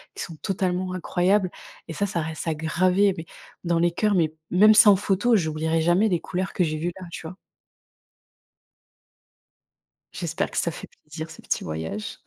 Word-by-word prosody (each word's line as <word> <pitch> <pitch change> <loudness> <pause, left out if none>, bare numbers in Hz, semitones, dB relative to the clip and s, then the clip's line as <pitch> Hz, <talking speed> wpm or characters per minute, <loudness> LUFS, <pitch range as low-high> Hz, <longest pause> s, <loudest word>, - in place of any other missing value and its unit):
qui - - -4
sont 165 - -8
totalement 185 -2 -1
incroyables, 185 +2 +1 0.4
et 165 - -6
ça, 200 - -1
ça 175 -3 -2
reste 160 +1 -5
à 165 - +1
graver, 185 +5 +2
mais 165 - -6 0.4
dans 170 -1 +1
les 175 +1 +3
cœurs, 210 +4 +1
mais 160 -4 +1 0.2
même, 215 +4 +6
sans 210 -2 +8
photo, 205 +4 +2
j'oublierai 160 -1 0
jamais 175 +6 +3
les 175 -4 0
couleurs 185 +1 -3
que 185 - +1
j'ai 155 -2 -1
vues 170 +3 -2
là, 180 - -8
tu 165 - -8
vois? 180 - -9 2.8
J'espère 165 -3 -3
que - - -6
ça 170 - +1
fait - - -9 0.2
plaisir, 160 +1 -7
ce - - -12
petit - - -2
voyage. 80 +7 -5
175 Hz, 175 wpm, -24 LUFS, 160-190 Hz, 2.8 s, sans